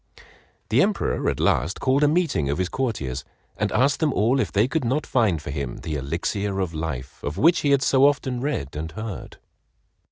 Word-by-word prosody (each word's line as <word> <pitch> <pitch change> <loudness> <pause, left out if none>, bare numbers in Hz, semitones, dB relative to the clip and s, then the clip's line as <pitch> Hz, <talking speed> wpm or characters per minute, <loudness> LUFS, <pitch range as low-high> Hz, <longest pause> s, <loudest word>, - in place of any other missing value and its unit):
The - - +4
Emperor - - +1
at - - -3
last 75 +9 +1
called 135 +2 +2
a - - +6
meeting 150 - +1
of 70 - 0
his 95 0 -1
courtiers 100 - -2 0.3
and - - -1
asked 140 +2 +2
them 155 -3 +2
all 120 +6 +2
if - - 0
they 105 +3 +3
could 160 +3 -1
not 130 +6 0
find 110 -10 +2
for 70 - -7
him 70 -3 -4
the 80 -1 -4
"Elixir 85 +8 -2
of 90 -3 -2
Life" 75 -5 -5
of 75 +4 -4
which 165 - +4
he 145 - 0
had 140 -1 +4
so 135 +1 +5
often 130 -3 -1
read 100 - -3
and 80 +2 -4
heard. 110 -1 -7
105 Hz, 200 wpm, -24 LUFS, -, 0.3 s, a